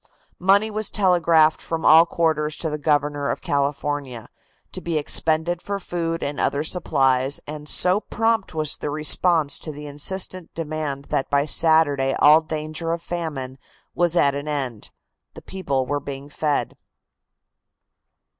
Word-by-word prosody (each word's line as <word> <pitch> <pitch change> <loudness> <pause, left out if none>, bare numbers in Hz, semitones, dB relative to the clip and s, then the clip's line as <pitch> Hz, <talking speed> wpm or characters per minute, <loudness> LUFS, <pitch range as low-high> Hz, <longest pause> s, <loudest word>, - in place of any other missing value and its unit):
Money 200 +4 +3
was 215 0 0
telegraphed 170 -5 +3
from 165 -1 -4
all 165 +2 +7
quarters 155 -3 0
to 160 - -2
the 150 - -4
Governor 145 -1 0
of - - -2
California, 140 -3 -3 0.4
to - - -5
be 170 -2 -2
expended 160 +3 0
for 200 0 -3
food 170 -3 -3
and 140 0 -4
other 145 +1 0
supplies, 135 -5 +1
and 150 0 -7
so 185 +2 +3
prompt 225 -4 -1
was 155 -2 -2
the - - -4
response 155 0 +2
to 155 - -7
the 150 0 -9
insistent 180 +5 -4
demand 155 -3 -4
that 135 - -1
by 140 0 +2
Saturday 150 -4 +3
all 150 +2 +6
danger 155 +1 -4
of 170 - -2
famine 145 -7 -5 0.3
was 175 -1 +1
at 140 -5 +3
an 145 +1 -5
end; 130 -7 -4 0.5
the - - -10
people 140 -9 -2
were 145 +2 -2
being 140 0 -8
fed. 150 0 -1
155 Hz, 145 wpm, -22 LUFS, 145-170 Hz, 0.5 s, all